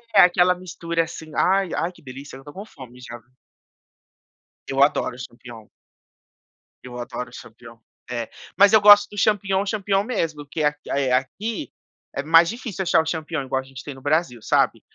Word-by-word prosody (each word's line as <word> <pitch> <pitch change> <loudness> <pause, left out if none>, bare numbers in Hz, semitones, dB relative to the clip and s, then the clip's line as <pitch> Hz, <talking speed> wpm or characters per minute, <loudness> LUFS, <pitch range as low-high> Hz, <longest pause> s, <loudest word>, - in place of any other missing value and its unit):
É, - - +9
aquela 180 0 +4
mistura 170 -2 -3
assim, 160 -1 -10
ai 195 0 +2
ai 170 +2 -1
que 180 - -20
delícia, 135 0 -10
eu - - -13
estou 145 +2 -12
com 200 +2 -8
fome, 125 - -14
já. 120 -1 -9 1.5
Eu 135 0 +3
adoro 140 -3 +1
o - - -13
champignon. 120 -3 -11 1.2
Eu 125 -1 -9
adoro 125 +1 -6
o - - -20
champignon. 115 0 -13 0.3
É, 120 -2 -4 0.3
mas 200 +1 +6
eu 220 - +8
gosto 205 0 +8
do 205 - -12
champignon, 200 -1 +1
champignon 200 -1 0
mesmo, 160 -10 -3
que 150 +2 -4
é - - +5 0.2
a 140 - 0
é 135 -2 0
aqui 200 - -2 0.4
é - - -2
mais 165 +2 +6
difícil 230 -5 -5
achar 170 - +3
o - - -7
champignon, 160 -2 -3
igual 130 0 -1
a - - -16
gente 135 -1 -11
tem 145 - -7
no 135 - -14
Brasil, 145 -4 0
sabe. - - +1
160 Hz, 190 wpm, -22 LUFS, 130-190 Hz, 1.5 s, É